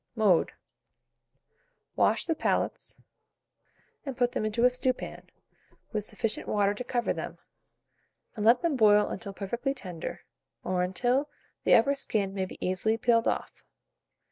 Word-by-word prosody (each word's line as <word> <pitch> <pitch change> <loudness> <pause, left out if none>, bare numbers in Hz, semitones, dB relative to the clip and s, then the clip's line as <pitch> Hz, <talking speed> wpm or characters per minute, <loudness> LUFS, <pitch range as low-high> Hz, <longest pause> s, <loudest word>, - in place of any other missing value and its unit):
Mode. 205 -7 +3 1.4
Wash - - +2
the 330 - +1
palates, - - -2 1.0
and 270 -4 -6
put 245 -1 +2
them 215 - -2
into 215 +2 0
a - - +7
stewpan, 255 0 -3 0.6
with 215 -1 -1
sufficient 220 +1 -2
water 205 -1 +2
to 210 - -5
cover 240 -1 -1
them, - - -6 1.0
and 210 - -3
let 235 +3 +5
them 335 -4 +1
boil 210 -3 +5
until 200 - -6
perfectly 235 +8 -3
tender, 180 -9 -6 0.4
or 180 0 0
until 245 +10 0 0.4
the - - +7
upper 260 +5 +4
skin 210 -8 -1
may 190 -1 -1
be - - -10
easily 185 +5 +1
peeled 230 -1 +2
off. - - -3
220 Hz, 140 wpm, -28 LUFS, 200-250 Hz, 1.4 s, a